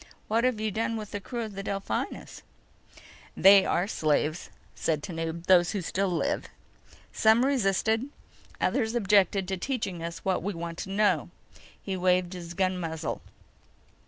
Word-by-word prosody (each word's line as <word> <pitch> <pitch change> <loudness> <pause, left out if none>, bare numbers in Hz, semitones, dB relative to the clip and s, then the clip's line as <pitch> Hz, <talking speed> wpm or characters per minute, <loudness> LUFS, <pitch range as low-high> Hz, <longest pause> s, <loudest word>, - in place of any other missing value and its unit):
What 230 +3 +2
have 250 -4 +1
you 215 0 -1
done 225 +2 -1
with 210 -2 -7
the 205 - -3
crew 235 +4 -5
of 215 -2 -7
the 195 - -5
Delphinus?" 195 0 -4 1.0
"They 195 0 +7
are 175 - +1
slaves," 155 -2 0 0.2
said 155 -2 -1
Tanub. 165 -1 -4
"Those 175 0 +5
who 200 - -1
still 195 +3 -1
live. 175 - -1 0.7
Some 225 +3 +4
resisted. 225 -1 +1 0.5
Others 220 +1 0
objected 200 -3 +3
to 190 0 -2
teaching 195 -6 -3
us 165 0 -6
what 190 -1 +1
we 200 0 -3
want 165 0 -6
to - - -5
know." 205 +1 +2 0.5
He 195 - -4
waved 180 -1 +2
the 175 -2 -8
gun 185 -1 0
muzzle. 160 -2 -4
190 Hz, 155 wpm, -28 LUFS, 175-215 Hz, 1.0 s, They